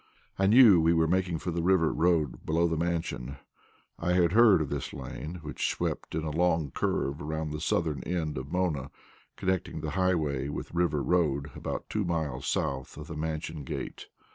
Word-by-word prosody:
I 95 - +4
knew 110 -5 +8
we 80 +1 +4
were 80 0 +3
making 90 0 +1
for 90 - -4
the 85 0 -1
River 85 -2 +3
Road 80 -6 +1
below 85 +2 +2
the 80 - -1
Mansion. 80 -5 -2 0.6
I 90 +1 0
had 85 -2 +3
heard 110 -2 +6
of 75 -3 -2
this - - -4
lane, 80 +4 -6
which 75 - -2
swept - - -3
in 80 - -1
a 80 - -2
long 80 -3 +1
curve 70 +2 -1
around 80 0 -3
the 75 0 -5
southern 80 -4 0
end 80 -3 -2
of 70 +3 -8
Mona, 80 -7 -1 0.5
connecting 95 -4 -1
the 75 -1 -3
Highway 80 -6 0
with 75 - -6
River 85 -4 +1
Road 75 -5 +1
about - - -5
two 105 - -1
miles 80 -7 -2
south 70 0 -2
of 75 - -7
the 80 - -5
Mansion 80 0 -4
gate. - - -6
80 Hz, 185 wpm, -29 LUFS, 75-90 Hz, 0.6 s, knew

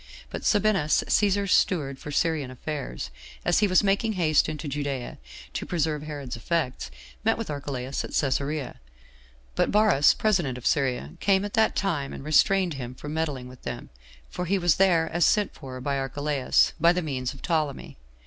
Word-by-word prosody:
But - - -5
Sabinus, 200 -7 +2
Cæsar's 200 -1 +2
steward 140 -8 +2
for - - -8
Syrian 150 -2 0
affairs, 130 - -5 0.3
as 175 - +3
he 210 - +3
was 185 +2 +4
making 205 +3 +1
haste 155 -6 +2
into 155 0 -5
Judea 140 -3 -4 0.3
to - - -3
preserve 155 -3 -1
Herod's 145 -5 -6
effects, 130 - -2 0.3
met - - +2
with - - -4
Archelaus 135 -2 -4
at - - -6
Cæsarea; 140 +1 -1 0.8
but - - +1
Varus 205 -9 +4
[president 175 - +1
of 125 - -10
Syria] 125 - 0
came 195 0 +2
at 205 - -6
that 220 -1 +3
time, 155 -8 -1
and - - -8
restrained 175 +4 +3
him 125 -2 -6
from 145 +3 -7
meddling 145 -6 -2
with 125 0 -13
them, - - -6 0.4
for 180 - -4
he 195 +3 +1
was 175 -4 +2
there 175 -4 +4
as 175 +1 +1
sent 210 -2 +2
for 130 -3 -9
by 140 +1 -1
Archceaus, 140 0 +1
by 170 +2 +6
the 180 0 -1
means 130 -3 -3
of 135 - -14
Ptolemy. 155 - -2
150 Hz, 175 wpm, -26 LUFS, 135-180 Hz, 0.8 s, by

